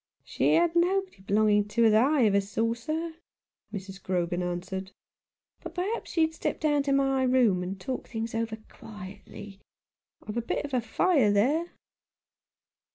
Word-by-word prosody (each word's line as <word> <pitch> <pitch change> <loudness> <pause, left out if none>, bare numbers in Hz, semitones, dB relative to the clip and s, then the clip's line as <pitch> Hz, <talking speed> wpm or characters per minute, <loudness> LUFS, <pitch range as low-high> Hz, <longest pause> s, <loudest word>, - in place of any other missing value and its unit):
"She - - +1
had 340 0 +2
nobody 370 - +1
belonging 205 +1 +2
to 230 +3 +1
her 225 - +6
that 260 +7 +4
ever 205 -2 +4
I - - +5
saw, 220 +3 -1
sir," 320 +7 -4 0.5
Mrs. 195 -2 -7
Grogan 175 -1 -1
answered; 185 +2 -4 0.3
" - - -59
but, - - -9
perhaps, 390 +2 -3
you'd 320 -1 +3
step - - -3
down 295 -2 +2
to 280 0 -1
my 270 -1 +2
room 250 -8 +3
and 190 +2 -5
talk 255 +7 -5
things 225 -1 -4
over 225 -1 -2
quietly. 200 -1 -11 0.7
I've 210 +2 -4
a - - +1
bit 280 +4 -3
of 250 -2 +1
fire 260 - +3
there." 285 +12 +1
230 Hz, 160 wpm, -28 LUFS, 200-295 Hz, 0.7 s, her